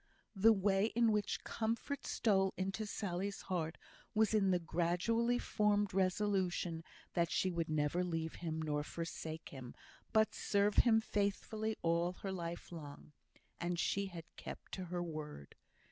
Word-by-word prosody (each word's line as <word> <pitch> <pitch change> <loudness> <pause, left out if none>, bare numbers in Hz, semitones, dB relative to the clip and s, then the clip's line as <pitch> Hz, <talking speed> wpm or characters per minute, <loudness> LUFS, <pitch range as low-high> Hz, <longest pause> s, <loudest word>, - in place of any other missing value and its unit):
The 215 +4 +7
way 195 0 +3
in 230 -1 +5
which 210 -1 0
comfort 230 +5 -2
stole 195 -3 +2
into 195 +3 -2
Sally's 200 -1 -2
heart 165 -3 -2 0.4
was 220 0 +4
in 200 -3 +4
the 180 - +4
gradually 180 +9 +1
formed 205 -4 +2
resolution 185 -3 +1 0.3
that 170 -1 +2
she 185 - +1
would 170 -2 -1
never 155 +3 +1
leave 165 -2 -2
him 160 -2 -2
nor 150 -1 0
forsake 160 0 -5
him, 130 -3 -9 0.4
but 220 0 +4
serve 205 0 +2
him 225 -2 +6
faithfully 215 +1 -1
all 170 +1 +2
her 195 - -1
life 170 -2 -5
long; 150 -3 -9 0.5
and 175 0 -1
she 200 +2 +1
had 170 -3 -7
kept - - -8
to 185 - -4
her 175 0 -2
word. 150 - -6
185 Hz, 145 wpm, -37 LUFS, 165-210 Hz, 0.5 s, The